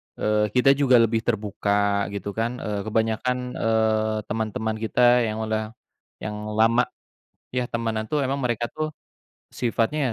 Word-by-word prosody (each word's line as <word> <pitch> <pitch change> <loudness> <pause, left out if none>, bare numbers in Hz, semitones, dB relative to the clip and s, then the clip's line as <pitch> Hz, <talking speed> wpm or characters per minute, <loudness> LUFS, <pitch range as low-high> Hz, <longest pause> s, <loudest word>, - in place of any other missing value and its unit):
eee, 105 0 +1
kita 125 +2 +6
juga 135 -2 +4
lebih 115 -1 +4
terbuka, 100 -2 0
gitu 100 0 -5
kan. 115 +3 -2
Eee, 105 -4 -4
kebanyakan, 115 +3 0 0.2
eee, 110 -1 +2 0.2
teman-teman 110 0 -2
kita 120 +1 +4
yang 110 +1 -3
udah 110 +1 -3 0.5
yang 105 0 -5
lama 115 +3 +4 0.7
ya 125 -1 0
temanan 110 -2 -2
tuh, 150 -2 +1
emang 135 +2 -1
mereka 120 -2 0
tuh 155 0 -2 0.6
sifatnya 120 +2 0
110 Hz, 135 wpm, -24 LUFS, 110-120 Hz, 0.7 s, kita